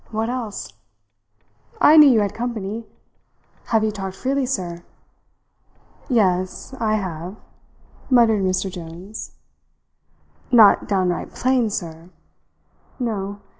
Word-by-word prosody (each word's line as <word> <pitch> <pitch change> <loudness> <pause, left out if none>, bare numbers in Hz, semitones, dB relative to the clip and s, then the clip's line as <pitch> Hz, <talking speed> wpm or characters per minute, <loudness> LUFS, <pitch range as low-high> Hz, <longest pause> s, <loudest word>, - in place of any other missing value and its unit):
What 220 +1 -2
else? 235 -5 -5 1.1
I 305 - +7
knew 300 -2 +9
you 230 -4 +4
had 205 -1 -1
company. 225 -1 -4 0.8
Have 220 -2 +1
you 215 - +1
talked 195 -2 -6
freely, 265 +3 -1
sir?" 180 -9 -3 1.3
"Yes, 185 -2 0
I 215 -1 +1
have," 180 -2 -5 0.7
muttered 230 -5 +4
Mr. 185 0 0
Jones. 180 +3 -9 1.2
"Not 225 -5 +6
downright 185 -3 0
plain, 255 -3 +1
sir?" 170 -4 -6 0.9
"No. 205 -4 -3
210 Hz, 100 wpm, -21 LUFS, 185-235 Hz, 1.3 s, knew